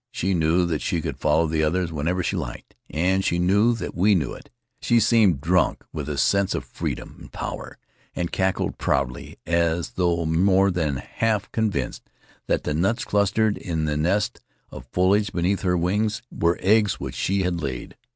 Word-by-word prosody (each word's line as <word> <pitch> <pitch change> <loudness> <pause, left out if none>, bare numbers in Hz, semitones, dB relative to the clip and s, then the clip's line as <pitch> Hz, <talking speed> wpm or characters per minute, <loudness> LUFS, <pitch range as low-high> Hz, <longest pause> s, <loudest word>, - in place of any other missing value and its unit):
She 95 +2 -1
knew 85 +1 +2
that 80 -3 -2
she 85 - -1
could - - -5
follow 75 +2 +3
the 80 0 0
others 85 +2 0
whenever 85 +4 -1
she 100 - -1
liked, 70 -9 -6 0.2
and 95 +4 +1
she 85 - +1
knew 100 +7 +3
that - - -5
we 100 +3 +3
knew 75 -8 -1
it. - - -12 0.3
She 120 - +3
seemed 110 - +3
drunk 90 +3 +1
with 75 -2 -4
a 75 - -3
sense 100 +7 +2
of - - -4
freedom - - -5
and - - -13
power, - - -6 0.4
and 85 -1 -2
cackled 95 0 -1
proudly, 65 -2 -1
as 85 0 0
though 85 -2 0
more 95 +4 +3
than 80 -6 -1
half 105 - -2
convinced 110 -4 -1 0.5
that - - 0
the - - -1
nuts 95 - 0
clustered 100 +1 +1
in 80 -4 -2
the 75 -1 -1
nest 100 +9 0 0.3
of - - -10
foliage 100 +3 +2
beneath 90 +3 0
her 90 -2 +1
were 105 0 0
eggs 105 +1 +3
which - - -5
she 95 0 0
had 90 -2 -1
laid. 65 -4 -5
90 Hz, 180 wpm, -24 LUFS, 80-100 Hz, 0.5 s, follow